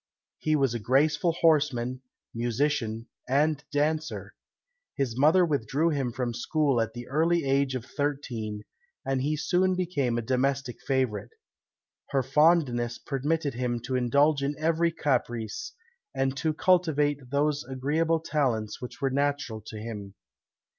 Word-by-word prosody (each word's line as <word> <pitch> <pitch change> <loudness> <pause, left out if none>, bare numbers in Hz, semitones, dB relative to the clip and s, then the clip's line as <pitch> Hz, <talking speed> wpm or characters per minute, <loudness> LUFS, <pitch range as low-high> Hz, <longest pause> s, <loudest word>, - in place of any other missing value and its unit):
He 155 0 +1
was 135 -5 +2
a 120 - -2
graceful 150 +9 +2
horseman, 140 -7 +2 0.3
musician, 115 -1 -1 0.2
and 150 +2 +2
dancer. 155 +2 -1 0.6
His 130 -5 -1
mother 155 +7 +5
withdrew 145 +1 +1
him 135 -5 -1
from 120 0 -2
school 135 +1 +1
at 115 0 -2
the 120 0 -8
early 165 +3 +2
age 135 -1 +1
of 125 -2 -4
thirteen, 125 -8 -3 0.4
and 135 -1 0
he 150 +3 0
soon 185 +4 +2
became 145 -10 0
a 120 - -2
domestic 130 +1 -1
favourite. 125 -5 -1 0.8
Her 135 -2 +1
fondness 130 -4 +3
permitted 145 +1 -1
him 120 0 -1
to 130 +2 -3
indulge 140 +4 +3
in 140 +1 -1
every 165 +2 +1
caprice, 125 - -2 0.4
and 135 0 0
to 155 +3 0
cultivate 150 -6 +2
those 145 +1 +1
agreeable 150 +6 0
talents 125 -10 -1
which 125 +3 -8
were 135 -1 +1
natural 140 -5 -1
to 110 - -7
him. 105 -3 -7
140 Hz, 135 wpm, -27 LUFS, 120-155 Hz, 0.8 s, mother